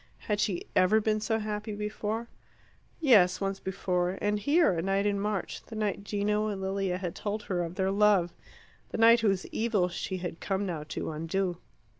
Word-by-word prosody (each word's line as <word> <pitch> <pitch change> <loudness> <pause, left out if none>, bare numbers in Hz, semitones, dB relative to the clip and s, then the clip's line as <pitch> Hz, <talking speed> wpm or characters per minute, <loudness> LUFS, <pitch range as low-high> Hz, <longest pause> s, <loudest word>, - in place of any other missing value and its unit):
Had 210 -1 -1
she 190 -4 0
ever 185 +4 +5
been 215 0 +1
so 220 +1 0
happy 215 0 -4
before? 210 +2 -3 0.7
Yes, 205 - +5
once 195 0 -2
before, 180 -1 -1
and 205 0 0
here, 295 - +3
a 165 - -1
night 195 +2 +1
in 200 -1 +1
March, 205 -2 -3
the 225 - -9
night 210 -2 -1
Gino 210 +1 0
and 205 -2 -3
Lilia 190 -1 -1
had 180 -2 -4
told 210 0 -4
her 180 -4 -1
of 170 +1 -6
their 190 0 +1
love 200 -4 +3 0.6
the - - -4
night 230 +1 +7
whose 195 -5 +1
evil 215 -6 +1
she 185 +1 -4
had 175 -2 -5
come 195 0 -1
now 165 -5 -3
to 155 - -4
undo. 170 +3 -2
200 Hz, 185 wpm, -29 LUFS, 185-210 Hz, 0.7 s, night